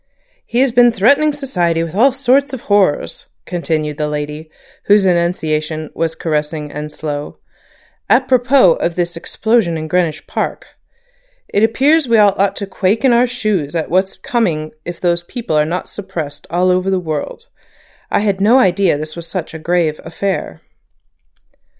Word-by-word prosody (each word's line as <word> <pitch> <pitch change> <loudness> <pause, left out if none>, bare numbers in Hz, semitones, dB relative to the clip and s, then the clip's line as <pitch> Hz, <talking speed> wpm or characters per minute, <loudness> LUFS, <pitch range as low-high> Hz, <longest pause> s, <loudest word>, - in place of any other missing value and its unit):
"He 240 - +1
has 270 -2 +3
been 240 0 +5
threatening 280 +9 +3
society 180 - -1
with 165 -1 -6
all 240 +8 +4
sorts 270 +1 +1
of 260 - -5
horrors," 200 -9 0 0.2
continued 155 -4 -2
the 150 - 0
lady, 150 +1 -5 0.4
whose 205 -1 +4
enunciation 160 -3 -1
was 165 -1 -2
caressing 150 -1 -3
and 150 +1 -6
slow, 150 -1 -5 0.7
"apropos 255 -6 +4
of 170 - -2
this 175 -1 -2
explosion 200 0 0
in 155 0 -5
Greenwich 170 -2 -1
Park. - - -3 0.8
It 205 - +1
appears 275 +6 +3
we 230 -1 +3
all 205 -2 +5
ought 195 0 +2
to 200 - -4
quake 200 +5 0
in 255 - +5
our 240 +1 +4
shoes 210 - -2
at 160 -1 -2
what's 190 +2 +1
coming 165 -11 -1
if 175 -1 -6
those 175 -1 +1
people 175 -1 -4
are 150 0 +3
not 175 +4 -3
suppressed 160 -8 -7
all 180 +2 +2
over 185 +1 +1
the 190 -1 +1
world. 160 - -5 0.6
I - - +1
had 200 -2 0
no 225 +6 +5
idea 190 - +3
this 155 +1 -6
was 170 -1 -7
such 170 -2 -5
a 160 - -7
grave 165 -2 0
affair." 190 +4 -4
180 Hz, 160 wpm, -16 LUFS, 160-225 Hz, 0.8 s, been